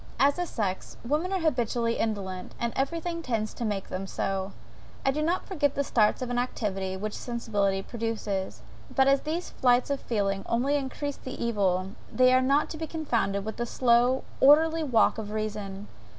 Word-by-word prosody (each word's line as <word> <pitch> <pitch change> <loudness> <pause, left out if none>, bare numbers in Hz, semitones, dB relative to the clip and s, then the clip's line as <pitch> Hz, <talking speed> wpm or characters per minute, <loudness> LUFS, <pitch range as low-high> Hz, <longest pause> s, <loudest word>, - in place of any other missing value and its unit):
As 280 +5 +4
a 355 - -1
sex, 195 -8 -3
women 305 +8 0
are 380 -2 0
habitually 240 -6 +1
indolent; 195 -4 -3
and 235 -1 -1
every 275 +5 0
thing 335 0 -4
tends 225 -7 -2
to - - -5
make 205 -3 -2
them 190 +1 -4
so. 195 0 -2 0.5
I 270 - +4
do 300 +3 -2
not 340 +4 0
forget 290 -7 0
the 280 - +1
starts 225 -1 +2
of 245 - -4
activity 205 -6 -2
which 210 +2 -4
sensibility 205 -5 -1
produces; 215 -4 -3 0.3
but 265 -1 +5
as 275 0 +4
these 330 +4 -3
flights 250 +1 +3
of 280 - 0
feeling 200 -3 -1
only 255 +5 +2
increase 285 +1 -3
the 260 - -7
evil, 195 -5 0 0.2
they 255 0 +5
are 255 - +5
not 275 +3 +3
to 315 - -5
be 320 0 -4
confounded 230 -11 -1
with 220 - -5
the 240 - -2
slow, 245 +2 +3 0.2
orderly 315 +4 +6
walk 230 -5 +3
of 210 -2 -5
reason. 210 -2 -4
235 Hz, 180 wpm, -28 LUFS, 205-280 Hz, 0.5 s, orderly